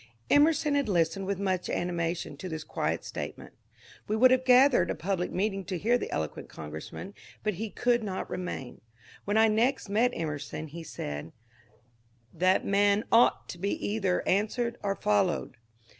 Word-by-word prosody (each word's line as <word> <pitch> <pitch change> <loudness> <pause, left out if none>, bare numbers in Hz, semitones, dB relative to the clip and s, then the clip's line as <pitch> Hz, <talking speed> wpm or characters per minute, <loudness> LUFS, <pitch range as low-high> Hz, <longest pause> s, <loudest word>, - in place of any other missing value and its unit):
Emerson 300 0 +4
had 280 -5 +1
listened 175 +1 +1
with 200 -1 -1
much 185 -2 -1
animation 170 -3 -2
to 185 +6 -7
this 160 -1 -5
quiet - - -2
statement - - -7 0.5
We 215 - 0
would 255 +3 +6
have 255 0 +3
gathered 255 +1 +5
a - - -1
public 180 0 -2
meeting 195 +1 -1
to 185 0 -3
hear 230 +7 +2
the - - -4
eloquent 75 -1 -4
congressman, 80 - -8 0.3
but 215 0 0
he 225 - -2
could 240 +2 +1
not 190 -3 -3
remain. 180 -8 -5 0.4
When 205 +2 +1
I 220 0 +6
next 225 +2 +1
met 225 +5 +3
Emerson 155 -1 -4
he 170 +3 -8
said, 75 - -6 1.0
That 185 +3 +2
man 200 +1 +3
ought 235 +2 +4
to 175 - -7
be 200 +3 0 0.2
either 195 -4 0
an 200 +3 +3
swered 235 +1 -3
or 195 -1 -1
followed." 195 -11 0
195 Hz, 165 wpm, -29 LUFS, 170-220 Hz, 1.0 s, would